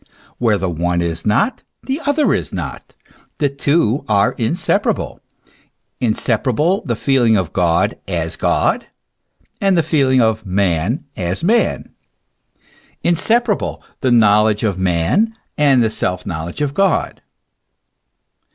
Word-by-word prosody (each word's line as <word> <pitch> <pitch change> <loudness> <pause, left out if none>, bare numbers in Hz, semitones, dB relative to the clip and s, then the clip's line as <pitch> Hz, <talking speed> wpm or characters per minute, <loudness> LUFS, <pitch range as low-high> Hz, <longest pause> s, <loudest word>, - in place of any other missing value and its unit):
Where 110 -4 +2
the 95 - -2
one 85 +1 -1
is 85 +1 -3
not, 205 - +1 0.2
the 270 +4 -3
other 290 +1 +2
is - - -2
not. - - -7 0.4
The 145 - +1
two 140 -2 +1
are 100 -1 +3
inseparable, 120 +10 -1 0.8
inseparable 125 - 0
the 120 - 0
feeling 120 -3 +2
of 90 -4 -2
God 90 +4 +1
as 85 -3 -3
God, - - 0 0.7
and 195 -2 +3
the 165 - +3
feeling 135 -5 +2
of 110 -2 +1
man 95 - 0
as 90 - -3
man, 225 +7 +1 1.1
inseparable 210 +6 +1 0.2
the 130 - 0
knowledge 105 -2 +4
of 100 -4 -1
man 95 - +1 0.2
and 140 -4 +4
the 110 - 0
self 90 -3 -2
knowledge 85 - -4
of 140 -1 -2
God. 195 +4 0
110 Hz, 125 wpm, -18 LUFS, 95-150 Hz, 1.1 s, knowledge